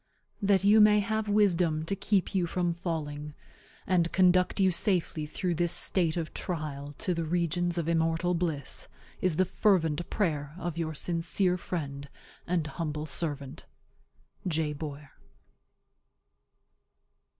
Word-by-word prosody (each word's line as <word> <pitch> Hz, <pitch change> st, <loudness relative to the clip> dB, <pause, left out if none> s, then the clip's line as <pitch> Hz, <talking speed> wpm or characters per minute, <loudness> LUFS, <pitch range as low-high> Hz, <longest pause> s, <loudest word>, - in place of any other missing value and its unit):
That 200 Hz, -1 st, +3 dB
you 210 Hz, +2 st, +6 dB
may 210 Hz, 0 st, +7 dB
have 220 Hz, +1 st, -1 dB
wisdom 175 Hz, -6 st, +2 dB
to 195 Hz, -, -1 dB
keep 195 Hz, -1 st, 0 dB
you 180 Hz, -3 st, +1 dB
from 175 Hz, 0 st, 0 dB
falling, 150 Hz, -4 st, -4 dB, 0.5 s
and 170 Hz, -2 st, +2 dB
conduct 185 Hz, +1 st, +3 dB
you 190 Hz, -1 st, +4 dB
safely 175 Hz, -5 st, 0 dB
through 180 Hz, +3 st, -2 dB
this 170 Hz, 0 st, +1 dB
state 175 Hz, -3 st, +1 dB
of 165 Hz, -2 st, -3 dB
trial 145 Hz, -4 st, -5 dB
to 180 Hz, -, -1 dB
the 165 Hz, -1 st, -2 dB
regions 175 Hz, +1 st, 0 dB
of 165 Hz, -2 st, -1 dB
immortal 165 Hz, +1 st, +1 dB
bliss, 165 Hz, -6 st, -3 dB, 0.3 s
is 185 Hz, -4 st, +1 dB
the 185 Hz, -, +3 dB
fervent 170 Hz, -5 st, +1 dB
prayer 150 Hz, -7 st, -1 dB
of 175 Hz, -3 st, -4 dB
your 160 Hz, -2 st, -3 dB
sincere 175 Hz, +3 st, 0 dB
friend 140 Hz, -6 st, -5 dB, 0.4 s
and 175 Hz, -3 st, 0 dB
humble 150 Hz, -1 st, -4 dB
servant, 145 Hz, -3 st, -5 dB, 0.8 s
J. 155 Hz, -3 st, 0 dB
BOYER. 145 Hz, -1 st, -7 dB
170 Hz, 130 wpm, -29 LUFS, 155-185 Hz, 0.8 s, may